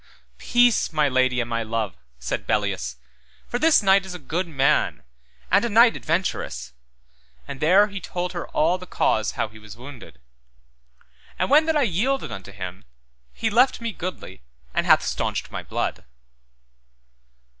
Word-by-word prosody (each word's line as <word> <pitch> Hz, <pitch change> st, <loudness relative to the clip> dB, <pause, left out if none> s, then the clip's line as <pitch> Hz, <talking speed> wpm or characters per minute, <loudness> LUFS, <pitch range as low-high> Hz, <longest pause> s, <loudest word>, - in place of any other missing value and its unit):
Peace, 240 Hz, -2 st, +3 dB
my 155 Hz, -2 st, +2 dB
lady 130 Hz, -1 st, +2 dB
and 120 Hz, -, -1 dB
my 115 Hz, -1 st, -2 dB
love, 110 Hz, -3 st, -3 dB, 0.2 s
said 65 Hz, -1 st, -4 dB
Belleus, -, -, -1 dB, 0.5 s
for 245 Hz, -, -3 dB
this 315 Hz, -6 st, +5 dB
knight 195 Hz, 0 st, +5 dB
is 190 Hz, -1 st, -7 dB
a -, -, -4 dB
good 170 Hz, +5 st, -3 dB
man, 140 Hz, -1 st, +1 dB, 0.5 s
and -, -, +5 dB
a 235 Hz, -, 0 dB
knight 230 Hz, +2 st, +6 dB
adventurous, 165 Hz, -, -2 dB, 0.7 s
and 135 Hz, -, -7 dB
there 185 Hz, +7 st, +5 dB
he 200 Hz, -2 st, -7 dB
told 180 Hz, +2 st, -4 dB
her 175 Hz, -, -5 dB
all 170 Hz, +4 st, +1 dB
the 180 Hz, -, -10 dB
cause 110 Hz, -9 st, 0 dB
how -, -, -1 dB
he 110 Hz, +1 st, -15 dB
was 105 Hz, +1 st, -12 dB
wounded; 125 Hz, -, -12 dB, 1.2 s
And -, -, -1 dB
when 310 Hz, +2 st, +6 dB
that 320 Hz, -1 st, +2 dB
I 290 Hz, -, +3 dB
yielded 245 Hz, +7 st, 0 dB
me -, -, -4 dB
unto 95 Hz, +1 st, -12 dB
him, 90 Hz, -2 st, -8 dB, 0.5 s
he 225 Hz, -, -2 dB
left 250 Hz, +5 st, +4 dB
me 230 Hz, -1 st, -3 dB
goodly 175 Hz, -, -7 dB, 0.3 s
and -, -, 0 dB
hath -, -, +6 dB
staunched -, -, -3 dB
my -, -, -4 dB
blood. -, -, -3 dB
170 Hz, 165 wpm, -23 LUFS, -, 1.2 s, knight